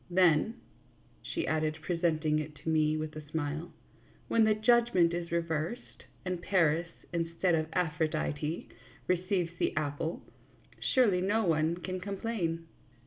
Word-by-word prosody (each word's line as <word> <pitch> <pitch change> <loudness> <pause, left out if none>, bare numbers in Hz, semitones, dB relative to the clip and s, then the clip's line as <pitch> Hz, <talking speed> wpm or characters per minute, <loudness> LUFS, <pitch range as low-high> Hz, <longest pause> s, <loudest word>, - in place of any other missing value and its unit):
Then," 180 +3 +4 0.7
she 335 - -3
added, 155 0 0
presenting 160 -3 +1
it 150 0 -5
to - - -2
me 155 -1 +3
with 155 0 -4
a 155 - -5
smile, 155 +1 -3 0.3
" - - -30
when 225 -1 +5
the 215 -1 +4
judgment 215 -6 +4
is 170 -1 -3
reversed, 165 +6 -3 0.2
and 180 -1 -2
Paris, 170 -3 +2 0.3
instead 165 +1 +1
of 155 -1 +1
Aphrodite, 155 -2 -1 0.4
receives 180 -1 0
the - - 0
apple, 150 +2 -2 0.7
surely 210 -9 +4
no 210 +4 +2
one 160 0 +2
can 185 +1 -4
complain." 185 -4 -3
170 Hz, 135 wpm, -31 LUFS, 155-185 Hz, 0.7 s, when